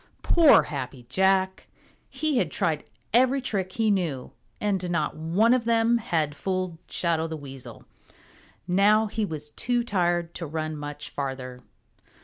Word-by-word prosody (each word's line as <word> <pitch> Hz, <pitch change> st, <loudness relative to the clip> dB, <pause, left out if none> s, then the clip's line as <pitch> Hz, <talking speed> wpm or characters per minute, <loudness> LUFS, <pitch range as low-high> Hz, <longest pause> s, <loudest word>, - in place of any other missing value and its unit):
Poor 325 Hz, -4 st, +6 dB
Happy 130 Hz, -3 st, -6 dB
Jack! 190 Hz, +4 st, +1 dB, 0.4 s
He 280 Hz, 0 st, 0 dB
had 175 Hz, -, 0 dB
tried 155 Hz, -2 st, -1 dB, 0.3 s
every 260 Hz, +3 st, +4 dB
trick 195 Hz, -7 st, -3 dB
he 220 Hz, -2 st, +2 dB
knew, 165 Hz, -10 st, -1 dB, 0.3 s
and 195 Hz, -4 st, -1 dB
not 155 Hz, -4 st, -1 dB
one 175 Hz, +10 st, +2 dB
of 250 Hz, -2 st, +1 dB
them 230 Hz, 0 st, +3 dB
had 155 Hz, -8 st, -1 dB
fooled 185 Hz, -1 st, -3 dB
Shadow 165 Hz, -2 st, 0 dB
the 160 Hz, -1 st, -5 dB
Weasel. 135 Hz, -3 st, -10 dB, 0.8 s
Now 205 Hz, +4 st, +4 dB
he 215 Hz, 0 st, -2 dB
was 150 Hz, -4 st, -6 dB
too 240 Hz, +6 st, 0 dB
tired 175 Hz, -5 st, 0 dB
to 165 Hz, -, -5 dB
run 155 Hz, +1 st, -3 dB
much 145 Hz, 0 st, -7 dB
farther. 130 Hz, -2 st, -5 dB
180 Hz, 140 wpm, -26 LUFS, 155-215 Hz, 0.8 s, Poor